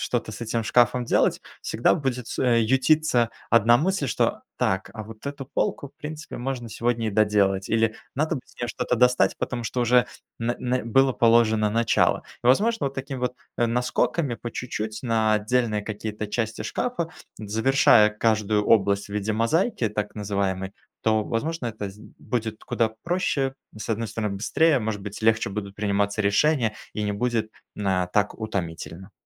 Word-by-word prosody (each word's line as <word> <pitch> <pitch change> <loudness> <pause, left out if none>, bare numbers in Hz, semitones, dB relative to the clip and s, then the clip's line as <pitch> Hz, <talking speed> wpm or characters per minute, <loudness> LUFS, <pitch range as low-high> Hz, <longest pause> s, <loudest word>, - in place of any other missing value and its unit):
что-то 120 -2 -2
с 105 - -9
этим 115 0 -1
шкафом 120 +2 +3
делать, - - +2 0.2
всегда 115 - +2
будет 125 -6 -3
с - - -6
э, 120 -2 +3
ютиться 130 0 +3 0.2
1 115 +1 +6
мысль, 160 +1 0
что: 115 - 0 0.2
"Так, 95 0 0
а 110 - -5
вот 110 +3 -11
эту 140 -1 -5
полку, 140 +1 -2
в - - -34
принципе, 155 +1 -7
можно 120 -2 -4
сегодня 115 0 -1
и - - -2
доделать". 100 -2 +2
Или: 115 -1 +1 0.2
"Надо 155 +3 0
бы - - -5
с - - -22
нее 120 - -2
что-то 125 - -1
достать, 125 -5 +3
потому 120 -1 -3
что 125 +1 -2
уже 120 +1 +4 0.3
н 115 - 0 0.2
н 120 -2 -1
было 135 +2 +4
положено 115 -2 +4
начало". 115 +1 +2 0.2
Возможно, 205 - +3
вот 135 - -4
такими 135 -1 -5
вот, 125 0 -2 0.2
э, 120 - +3
наскоками, 125 +3 0
по 120 - -7
чуть-чуть, 110 -3 -4
на 110 -3 +2
отдельные 110 0 0
какие-то 105 0 -5
части 110 0 -2
шкафа, 245 -10 -2 0.3
завершая 110 0 +4
каждую 105 -1 +1
область 100 -2 +3
в - - -18
виде 105 +1 -1
мозаики, 125 - +1
так 105 0 -4
называемой, 100 -2 -2 0.3
то, 110 -1 +2
возможно, 140 +3 -2
это 105 -3 -4
з 100 - -16 0.2
будет 110 -3 -3
куда 115 -2 0
проще: 150 -7 0 0.2
с 105 - -7
одной 115 0 -1
стороны- 105 -2 -3
быстрее, 150 +7 +3
может 110 -2 -3
быть, 105 +2 -8
легче 110 0 +3
будут 100 -1 -5
приниматься 100 0 0
решения, 115 +2 +2 0.2
и 105 - -3
не 105 -1 -1
будет 110 0 -1 0.2
на 95 -3 0
так 105 +2 +1
утомительно. 90 -3 -5
115 Hz, 170 wpm, -25 LUFS, 105-125 Hz, 0.3 s, 1